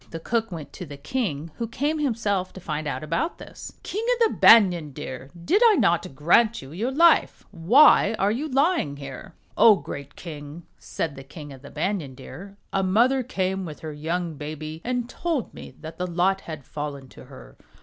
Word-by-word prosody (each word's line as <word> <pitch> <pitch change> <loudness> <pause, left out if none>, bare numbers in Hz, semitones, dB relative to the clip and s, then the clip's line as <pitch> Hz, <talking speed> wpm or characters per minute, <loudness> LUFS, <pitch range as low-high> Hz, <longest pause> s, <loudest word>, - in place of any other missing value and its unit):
The 165 - -6
cook 225 +4 -1
went 160 -4 -8
to 180 - -7
the 145 0 -9
king, 160 - -3
who 230 - -3
came 290 +7 -1
himself 215 -9 -1
to - - -9
find 155 -3 -4
out 145 - -3
about 165 - -2
this. - - -10
"King 425 +3 -4
of 465 -2 +2
the - - -9
Banyan 175 -10 +6
Deer! 130 +1 -7 0.2
did 405 +5 +3
I 450 -3 +6
not 175 - +1
grant 220 - +3
you 135 - -11
your 210 +10 -2
life? 335 +6 +3
Why 225 - +5
are 200 +1 +2
you 285 +8 -3
lying 270 - +1
here 140 -2 -9
?" - - -35
"O 220 -2 +8
great 140 -4 -8
King!" 150 -1 -9 0.2
said 155 -4 -4
the 135 - -9
King 145 +1 -10
of 130 - -13
the 140 - -11
Banyan 155 -4 -3
Deer, 195 +8 -11 0.2
"a 195 - +2
mother 235 +8 +3
came 190 -5 -2
with 155 -4 -8
her 155 -1 -6
young 165 +3 -3
baby 155 +2 -7
and 245 -1 -2
told 315 -1 -3
me - - -11
that 160 +1 -9
the 180 - -1
lot 180 +3 +1
had 155 -5 -7
fallen 145 -3 -6
to - - -14
her. - - -14
180 Hz, 200 wpm, -24 LUFS, 150-235 Hz, 0.2 s, O